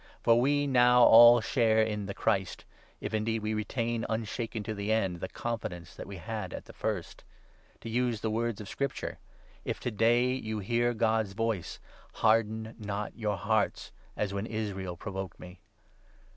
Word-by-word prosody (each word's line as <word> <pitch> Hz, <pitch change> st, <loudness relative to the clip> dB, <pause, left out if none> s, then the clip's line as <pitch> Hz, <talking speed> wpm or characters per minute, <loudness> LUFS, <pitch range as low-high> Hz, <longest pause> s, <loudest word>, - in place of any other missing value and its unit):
For 115 Hz, +1 st, +5 dB
we 145 Hz, +2 st, +2 dB
now 125 Hz, -2 st, +5 dB
all 120 Hz, +1 st, +9 dB
share 110 Hz, -2 st, +2 dB
in 105 Hz, -2 st, -3 dB
the 100 Hz, -, -5 dB
Christ, 95 Hz, -5 st, -1 dB, 0.3 s
if -, -, -5 dB
indeed 110 Hz, 0 st, -1 dB
we 110 Hz, 0 st, -1 dB
retain, 115 Hz, +2 st, -2 dB
unshaken 110 Hz, 0 st, -3 dB
to 110 Hz, -, -4 dB
the 100 Hz, +1 st, -3 dB
end, 95 Hz, -6 st, 0 dB
the -, -, -4 dB
confidence 100 Hz, -8 st, -5 dB
that -, -, -9 dB
we 100 Hz, -1 st, -7 dB
had 105 Hz, -1 st, -5 dB
at -, -, -8 dB
the -, -, -13 dB
first. -, -, -4 dB, 0.6 s
To -, -, -8 dB
use 120 Hz, -1 st, 0 dB
the 110 Hz, -, -1 dB
words 115 Hz, -1 st, -1 dB
of 105 Hz, -, -8 dB
Scripture 140 Hz, +5 st, -4 dB
— -, -, -29 dB
' -, -, -29 dB
If -, -, -5 dB
to 125 Hz, -, -2 dB
day 120 Hz, +4 st, +3 dB
you 110 Hz, -4 st, -3 dB
hear 120 Hz, +4 st, 0 dB
God's 110 Hz, -2 st, +1 dB
voice, 110 Hz, -4 st, -2 dB, 0.3 s
Harden 110 Hz, 0 st, +1 dB
not 105 Hz, -1 st, -4 dB
your 105 Hz, -3 st, -2 dB
hearts, 110 Hz, 0 st, 0 dB, 0.3 s
as 100 Hz, -2 st, -1 dB
when 100 Hz, +2 st, -3 dB
Israel 95 Hz, -5 st, -4 dB
provoked 95 Hz, -1 st, -6 dB
me.' 90 Hz, 0 st, -11 dB
110 Hz, 175 wpm, -30 LUFS, 100-115 Hz, 0.6 s, all